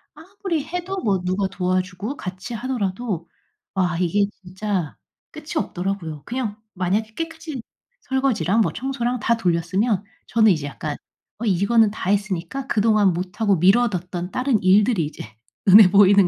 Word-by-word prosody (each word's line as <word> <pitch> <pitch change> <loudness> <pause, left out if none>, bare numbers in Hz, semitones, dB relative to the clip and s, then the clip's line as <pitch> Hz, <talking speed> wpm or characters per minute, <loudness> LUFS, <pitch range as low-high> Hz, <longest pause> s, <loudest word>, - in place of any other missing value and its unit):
아무리 340 -1 -4
해도 360 +4 -4
뭐 195 -4 +1
누가 185 +2 0
도와주고 185 +6 -2
같이 185 +4 -6
하더라도 215 -6 -3 0.5
와 180 -4 0
이게 190 +3 +2 0.2
진짜 185 -3 -3 0.3
끝이 310 0 -8
없더라고요. 180 - -3
그냥 235 -4 -3 0.2
만약에 200 +4 -1
깨끗이 325 -4 -5 0.4
설거지랑 235 - +1
뭐 - - +1
청소랑 250 0 -2
다 230 +1 +1
돌렸으면 190 +3 +1 0.2
저는 220 -2 +4
이제 155 -5 -1
약간 145 +1 -5 0.4
어 235 - -3
이거는 210 +3 +3
다 195 -3 -4
했으니까 205 +5 -1
그동안 210 -4 +3
못하고 190 +4 0
미뤄뒀던 180 -2 +1
다른 255 -4 +1
일들이 195 -1 +4
이제 150 - -7 0.4
눈에 195 0 +9
보이는 200 0 +6
205 Hz, 325 characters per minute, -22 LUFS, 185-240 Hz, 0.5 s, 눈에